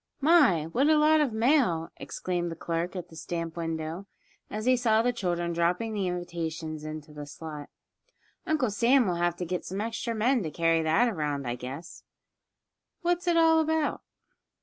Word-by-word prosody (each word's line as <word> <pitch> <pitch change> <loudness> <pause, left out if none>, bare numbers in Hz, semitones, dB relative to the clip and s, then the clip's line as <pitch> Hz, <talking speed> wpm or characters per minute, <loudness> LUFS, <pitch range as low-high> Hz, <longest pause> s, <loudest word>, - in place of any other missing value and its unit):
"My! 285 - +5
what 255 - +1
a 310 - +5
lot 305 +1 +5
of 285 -5 +1
mail!" 220 - +2
exclaimed 175 -1 -3
the - - -5
clerk 170 +2 -3
at 180 - -6
the 160 - -14
stamp 165 0 -4
window, 165 +2 -4 0.4
as 215 +1 -4
he 255 0 +5
saw 225 -2 +2
the 245 +1 +1
children 175 -5 -2
dropping 175 +7 0
the 200 -3 -1
invitations 165 -3 -4
into 155 -1 -7
the 145 -1 -8
slot. 150 -1 -8 0.8
"Uncle 295 -8 +1
Sam 245 +5 +4
will 180 - 0
have 175 0 +1
to 180 - -4
get 180 +1 -3
some 190 +2 -5
extra 230 +1 -3
men 240 +3 +2
to 165 - -3
carry 165 +1 +2
that 160 +10 +3
around, 150 - -2
I 120 - -1
guess. 130 +7 -8 1.0
What's 350 +1 0
it 340 -1 +3
all 325 -1 +5
about?" 320 -1 0
180 Hz, 175 wpm, -28 LUFS, 165-245 Hz, 1.0 s, My